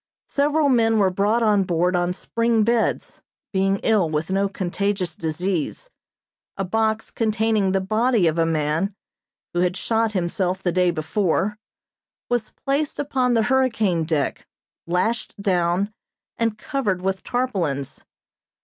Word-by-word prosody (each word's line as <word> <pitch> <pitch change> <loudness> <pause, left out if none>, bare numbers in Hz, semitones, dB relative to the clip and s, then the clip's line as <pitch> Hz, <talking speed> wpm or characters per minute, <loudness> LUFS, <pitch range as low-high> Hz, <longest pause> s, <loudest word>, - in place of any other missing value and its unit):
Several 290 +1 +2
men 225 -4 +3
were 195 -3 +3
brought 210 +5 +1
on 210 -3 +4
board 180 0 +1
on 175 0 +1
spring 230 +4 0
beds, 230 +1 0 0.3
being 195 +1 +2
ill 210 -7 +3
with 155 +3 -2
no 195 +1 +1
contagious 190 -1 -2
disease. 175 - -3 0.7
A 195 - -1
box 220 +3 0
containing 220 -3 +1
the 190 0 +1
body 220 +1 +2
of 165 0 +1
a 165 - +4
man, 160 +5 0 0.6
who 175 - 0
had 180 +1 +1
shot 225 +1 0
himself 185 0 -1
the 175 - +1
day 180 0 +3
before, 190 +5 0 0.7
was 240 -3 0 0.2
placed 280 +2 0
upon 260 -4 +1
the 225 - +3
hurricane 225 -9 +2
deck, 155 -3 -2 0.4
lashed 190 +6 -1
down, 185 +1 +1 0.4
and 225 -2 -1
covered 210 -8 -2
with 190 0 -1
tarpaulins. 175 - -2
195 Hz, 135 wpm, -23 LUFS, 180-225 Hz, 0.7 s, on